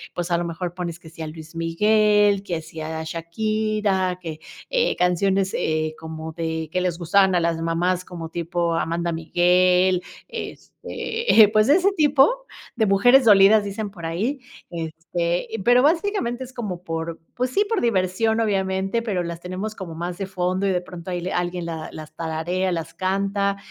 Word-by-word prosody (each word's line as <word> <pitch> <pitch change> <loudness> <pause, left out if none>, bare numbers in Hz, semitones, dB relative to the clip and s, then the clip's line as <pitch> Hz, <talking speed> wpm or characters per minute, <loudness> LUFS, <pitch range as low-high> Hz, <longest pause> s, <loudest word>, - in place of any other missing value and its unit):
pues, 175 0 -3
a 170 - +3
lo 175 - -2
mejor 170 +1 -4
pones 175 -2 -5
que 165 -1 -14
sí 165 0 -12
a 160 - -4
Luis 160 +1 -10
Miguel, 205 +4 +3
que 170 -4 -3
si 160 0 -10
a 160 +1 -4
Shakira, 190 +3 -1
que, 160 -3 -6 0.3
eh, - - +1
canciones, 190 +2 +1
eh, 155 0 -1
como 160 0 -7
de 160 -1 -3
que 180 - 0
les 180 -2 -1
gustaban 190 +2 +3
a 175 - +3
las 165 -1 0
mamás 175 +2 0
como 170 -3 -7
tipo 170 0 -1
Amanda 170 +1 -1
Miguel, 180 +2 +3 0.3
este, 450 - +1
pues 215 0 +4
de 290 - +6
ese 385 +2 +3
tipo 305 - +3 0.3
de 225 -3 +2
mujeres 245 +7 +5
dolidas 205 0 +7
dicen 205 +1 -4
por 175 -4 -10
ahí, 210 - -2 0.3
este, 170 +1 -3 0.2
pero 245 +1 +6
básicamente 310 - +1
es 260 0 -11
como 200 -8 -5
por, 165 0 -4 0.2
pues 250 +1 0
sí 405 +11 +1
por 445 -2 0
diversión 220 +1 +1
obviamente, 195 0 0
pero 200 -6 -1
las 170 0 -6
tenemos 185 +4 -4
como 180 -5 -7
más 175 +1 -4
de 195 - -3
fondo 185 +1 -1
y - - +2
de 180 - +1
pronto 180 0 -9
de 180 - -2
ahí - - -4
le 185 - -3
alguien 175 0 -2
la 160 -2 -5
las 155 0 -10
tararea, 170 +4 -2
las 165 -2 -4
canta 200 +1 0
180 Hz, 180 wpm, -23 LUFS, 165-210 Hz, 0.3 s, dolidas